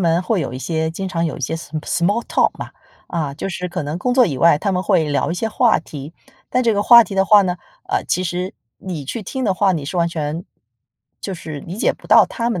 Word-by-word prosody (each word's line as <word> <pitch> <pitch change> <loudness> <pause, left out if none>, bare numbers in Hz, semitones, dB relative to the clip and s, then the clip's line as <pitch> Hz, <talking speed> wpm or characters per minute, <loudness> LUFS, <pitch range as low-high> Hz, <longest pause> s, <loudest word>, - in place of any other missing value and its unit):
们 170 -1 +2
会 195 0 0
有 135 - -3
一 130 - -5
些 160 +2 -2
经 190 +3 -5
常 170 -2 -1
有 160 - -3
一 - - -10
些 150 +5 -2
s 165 -3 -8
small 200 +7 0
talk - - +2
嘛， - - -6 0.4
啊， 155 -5 -3
就 170 - -5
是 180 0 -4
可 175 -3 -4
能 150 +3 -3
工 245 +8 -1
作 250 -2 +5
以 140 -8 -3
外， 165 0 +5
他 200 +2 -1
们 180 0 0
会 170 -4 +2
聊 145 +2 0
一 - - -1
些 225 +4 -2
话 235 +1 +3
题。 150 -1 -9 0.4
但 250 0 +1
这 225 -2 +3
个 205 - +1
话 235 +1 +8
题 200 - -7
的 195 0 +3
话 205 0 +6
呢， 180 -1 -1 0.3
呃， - - 0
其 185 - -1
实 180 +2 -3 0.3
你 170 -7 -6
去 220 - -5
听 260 +6 -4
的 195 -3 +1
话， 195 0 +2
你 155 -6 -2
是 180 - -5
完 170 0 +2
全， 160 +1 -4 0.8
就 195 - -5
是 155 -4 -7
理 175 - -8
解 - - +2
不 - - -17
到 - - +7
他 235 -1 -2
们 185 -7 -2
180 Hz, 315 characters per minute, -19 LUFS, 160-200 Hz, 0.8 s, 话